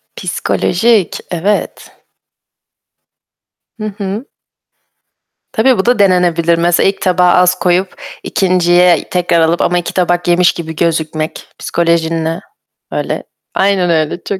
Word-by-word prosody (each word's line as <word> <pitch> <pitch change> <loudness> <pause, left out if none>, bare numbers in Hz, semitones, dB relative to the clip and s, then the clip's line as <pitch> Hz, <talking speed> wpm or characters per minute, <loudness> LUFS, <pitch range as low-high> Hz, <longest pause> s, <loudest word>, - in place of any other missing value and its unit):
Psikolojik, 210 +1 0
evet. 190 +5 -2 1.9
Hı 215 - -7
hı. 205 +5 -4 1.3
Tabii, 245 +2 +2
bu 190 - -1
da 245 -2 +2
denenebilir. 175 -3 +2
Mesela 175 +2 +2
ilk 195 - -6
tabağı 180 -1 +3
az 180 0 +3
koyup 180 +1 0 0.2
2.'ye 180 -2 +2
tekrar 175 -2 +1
alıp 165 +1 +1
ama 175 - +1
2 175 - -5
tabak 175 -1 0
yemiş 175 0 +4
gibi 160 -1 -7
gözükmek 160 -1 -2
psikolojinle. 165 -1 -1 0.5
Öyle - - -3 0.3
Aynen 190 -2 +1
öyle. 160 +1 -1
Çok 200 - -4
175 Hz, 115 wpm, -14 LUFS, 170-190 Hz, 1.9 s, yemiş